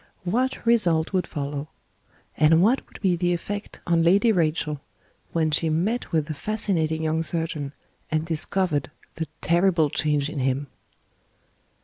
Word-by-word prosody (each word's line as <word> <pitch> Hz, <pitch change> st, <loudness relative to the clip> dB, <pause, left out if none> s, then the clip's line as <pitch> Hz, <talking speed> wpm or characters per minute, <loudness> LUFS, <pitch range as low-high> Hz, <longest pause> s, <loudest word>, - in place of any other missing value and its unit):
What 245 Hz, +10 st, -1 dB
result 180 Hz, -8 st, +3 dB
would 185 Hz, -1 st, +1 dB
follow? 145 Hz, 0 st, -4 dB, 0.7 s
And 160 Hz, +3 st, +5 dB
what 240 Hz, +6 st, +3 dB
would -, -, -13 dB
be 185 Hz, -3 st, +3 dB
the 175 Hz, +1 st, +1 dB
effect 205 Hz, +4 st, -5 dB
on 170 Hz, -1 st, +3 dB
Lady 200 Hz, +7 st, +4 dB
Rachel, 155 Hz, -5 st, 0 dB, 0.5 s
when 160 Hz, -2 st, +1 dB
she 160 Hz, +2 st, +1 dB
met 185 Hz, +11 st, -1 dB
with 160 Hz, -3 st, +1 dB
the 155 Hz, -, -4 dB
fascinating 160 Hz, -3 st, -1 dB
young 160 Hz, +1 st, +1 dB
surgeon, 160 Hz, -4 st, -3 dB, 0.4 s
and 155 Hz, 0 st, 0 dB
discovered 160 Hz, -3 st, 0 dB, 0.3 s
the 160 Hz, 0 st, -3 dB
terrible 170 Hz, -3 st, +3 dB
change 150 Hz, -2 st, +1 dB
in 150 Hz, -1 st, -5 dB
him? 135 Hz, +2 st, 0 dB
165 Hz, 140 wpm, -24 LUFS, 155-185 Hz, 0.7 s, And